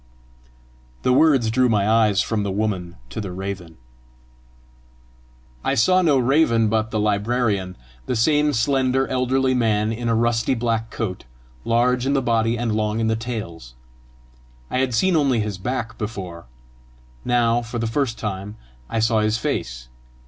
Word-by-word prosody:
The 125 - +3
words 135 -6 +4
drew 125 +1 +3
my 105 -3 +2
eyes 110 -3 +3
from 110 -2 -1
the 100 - -2
woman 95 -4 -2 0.2
to - - -4
the 100 -3 -5
raven. 95 -3 -6 1.9
I - - 0
saw 185 +11 +4
no 155 -6 +3
raven, 125 -4 +3
but 110 0 0
the 110 - -2
librarian 105 -2 0 0.3
the 125 - -1
same 150 +6 +3
slender 130 +1 +1
elderly 130 +1 +1
man, 110 -3 +1
in 115 +1 -3
a 115 - +2
rusty 120 +2 +1
black 115 -1 -1
coat, 100 -4 -5 0.4
large 125 +2 +2
in 140 - +1
the 135 - +2
body 115 0 +1
and 115 -1 -1
long 105 0 -1
in 110 0 +1
the 110 - +1
tails. 105 - -6 1.0
I 130 - 0
had 130 -3 0
seen 180 +10 +2
only 140 -6 +2
his 105 -3 -3
back 115 +1 -4
before; 95 -6 -6 0.8
now 120 -1 +2
for 120 +1 -6
the 115 - -1
first 115 0 -1
time 105 0 -5 0.3
I 115 - -3
saw 110 0 +2
his 110 +1 +1
face. 60 - -3
115 Hz, 155 wpm, -22 LUFS, 105-125 Hz, 1.9 s, words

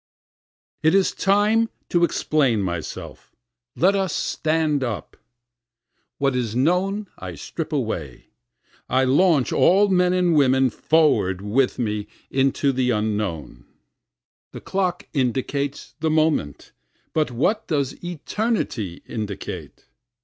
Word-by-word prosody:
44 - - +1
It 185 +5 +6
is 190 - +1
time 210 +3 +2 0.2
to 175 -1 +2
explain 140 -9 +1
myself 85 -3 -6 0.4
let 190 +4 +3
us 195 -2 0
stand 155 -3 0
up. 110 - -4 1.0
What 140 -2 +1
is 115 -3 -2
known 185 +9 +1
I - - -7
strip 160 -2 -6
away, 110 - -4 0.6
I 130 +1 +3
launch 145 +1 +3
all 200 +3 +4
men 180 -1 +3
and 180 -2 +2
women 130 -3 +4
forward 150 - +2
with 125 +6 +1
me 105 -4 -2 0.2
into 135 +1 +2
the 130 -1 0
Unknown. 105 - -2 0.9
The - - -8
clock 185 -2 -2
indicates 140 +1 -2
the 160 0 0
moment 155 - 0 0.4
but 155 -3 +1
what 185 - 0
does 140 -2 -2
eternity 175 - -3
indicate? 105 -3 -6
140 Hz, 115 wpm, -23 LUFS, 115-175 Hz, 1.0 s, It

